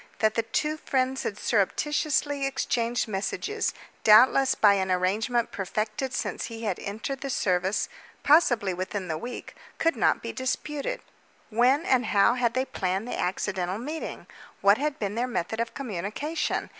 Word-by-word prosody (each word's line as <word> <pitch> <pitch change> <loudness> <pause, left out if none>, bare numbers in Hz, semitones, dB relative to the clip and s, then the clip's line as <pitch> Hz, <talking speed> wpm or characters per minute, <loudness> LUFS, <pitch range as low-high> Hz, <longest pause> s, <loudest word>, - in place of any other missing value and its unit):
That 215 -1 +2
the 230 - +1
two 300 +7 -1
friends 265 -3 0
had 205 - -3
surreptitiously 285 +6 0
exchanged 240 -3 -1
messages, 215 - -2 0.3
doubtless 255 +5 +6
by 205 -2 +6
an 190 -1 0
arrangement 215 +6 +1
perfected 215 +6 -3
since 245 - -3
he 230 -1 -7
had 200 -5 -1
entered 225 +7 -5
the 275 - -4
service 185 -4 +1 0.4
possibly 240 - +4
within 185 +1 -4
the 160 - -1
week 245 +8 -7 0.2
could 330 0 +2
not - - +2
be - - -4
disputed. 280 +3 -3 0.5
When 255 +8 +3
and 255 -1 +2
how 200 +2 +4
had 240 -1 0
they 260 +1 +1
planned 190 -1 -2
the - - -4
accidental 185 0 -1
meeting? 300 +8 -6 0.4
What 200 +4 +5
had 300 0 -1
been 205 -2 -2
their 240 +3 -1
method 220 -2 -3
of 230 0 -2
communication? 250 - -3
230 Hz, 155 wpm, -27 LUFS, 200-265 Hz, 0.5 s, doubtless